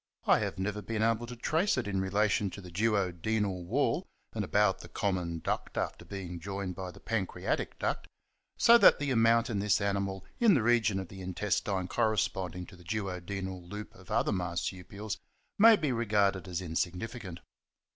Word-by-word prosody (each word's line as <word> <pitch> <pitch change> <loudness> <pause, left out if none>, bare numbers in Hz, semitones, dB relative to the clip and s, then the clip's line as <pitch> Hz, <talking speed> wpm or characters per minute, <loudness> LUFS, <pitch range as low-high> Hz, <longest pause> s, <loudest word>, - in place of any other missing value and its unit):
I - - +5
have - - -3
never 105 +2 -2
been 110 0 -2
able 115 +1 +1
to 125 - -7
trace 160 - +1
it 125 - -1
in 95 -2 0
relation 100 +1 +1
to 100 - -9
the 90 -2 -11
duo 100 0 +1
denal 95 +1 -1
wall 140 - 0 0.3
and 110 - -2
about 95 0 +2
the - - -11
common 90 -4 -1
duct - - -3
after - - -2
being 90 -3 -6
joined 95 +1 -4
by 95 0 -6
the 90 - -12
pancreatic 105 -5 -2
duct, - - -2 0.5
so 235 0 +7
that - - +8
the 145 -1 -1
amount 115 0 +4
in 105 - 0
this 105 +1 +2
animal 100 -1 -1
in 225 -6 +6
the 125 - +2
region 115 -4 +3
of 95 -3 -6
the 95 -1 -9
intestine 95 0 -1
corresponding 95 -4 0
to - - -14
the 90 - -16
duo 95 -1 -3
denal 95 0 -5
loop 105 +2 -7
of - - -16
other - - +1
Marsupials 90 +3 -3 0.4
may 225 +2 +9
be 150 -9 -1
regarded 100 -5 +1
as 90 0 -3
insig 85 0 -1
nificant. 105 -3 -6
100 Hz, 185 wpm, -31 LUFS, 95-115 Hz, 0.5 s, may